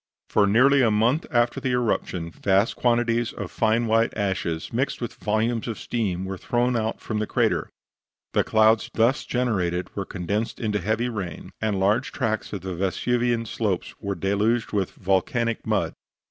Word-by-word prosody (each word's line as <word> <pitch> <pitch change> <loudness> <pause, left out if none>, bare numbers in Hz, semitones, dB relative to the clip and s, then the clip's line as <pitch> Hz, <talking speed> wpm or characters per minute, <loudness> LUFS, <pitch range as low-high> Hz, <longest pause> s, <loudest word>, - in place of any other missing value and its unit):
For 105 -1 +3
nearly 130 +7 +5
a 120 - +4
month 115 +9 +2
after 120 0 +2
the 130 -2 -1
eruption 95 -8 -1
vast 100 +5 +1
quantities 120 -1 +1
of - - -6
fine 115 +1 +2
white 115 +1 +3
ashes, 95 -5 -2
mixed 130 +4 -1
with 120 - -4
volumes 110 +2 -1
of 115 - -3
steam, 95 -6 -2
were 95 -1 -5
thrown 125 0 +1
out 110 -1 -1
from 110 -1 -3
the 110 - -1
crater; - - +1 0.6
the - - +3
clouds 110 0 +3
thus 115 +4 +3
generated 90 -8 -1
were 100 - -2
condensed 100 +5 -3
into 105 -3 0
heavy 110 +6 0
rain, 100 -7 -6
and 105 -3 0
large 100 +4 +2
tracts 110 -1 -2
of 100 - -4
the 95 0 -4
Vesuvian 115 +6 0
slopes 105 -5 -2
were 100 -1 -3
deluged 105 +6 0
with 100 -3 +1
volcanic 110 +5 0
mud. - - 0
110 Hz, 165 wpm, -24 LUFS, 100-120 Hz, 0.6 s, nearly